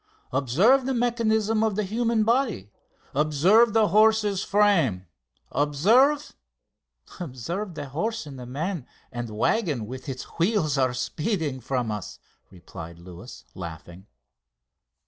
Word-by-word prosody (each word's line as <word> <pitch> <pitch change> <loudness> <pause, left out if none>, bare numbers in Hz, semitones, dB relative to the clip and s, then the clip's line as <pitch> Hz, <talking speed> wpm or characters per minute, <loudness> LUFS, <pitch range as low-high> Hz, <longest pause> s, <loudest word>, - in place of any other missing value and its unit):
Observe 205 - +3
the 265 - 0
mechanism 225 -2 +1
of 220 -3 0
the 215 - 0
human 225 +2 0
body; 225 - 0 0.4
observe 170 - +4
the 220 -3 +3
horse's 215 -1 +3
frame; 170 - +2 0.5
observe...." 225 - +3 0.9
"Observe 170 - -5
that 145 -3 -6
horse 220 +9 -3
and 140 -3 -9
man 155 +3 -4 0.2
and 120 -2 -5
waggon 130 - 0
with 130 +5 -8
its 130 -1 -5 0.2
wheels 170 -5 +2
are 130 -2 +1
speeding 150 - -2
from 125 -2 -2
us," 105 -2 -6 0.3
replied 85 -2 -10
Luis, 90 +6 -12
laughing. 85 +2 -9
165 Hz, 115 wpm, -25 LUFS, -, 0.9 s, observe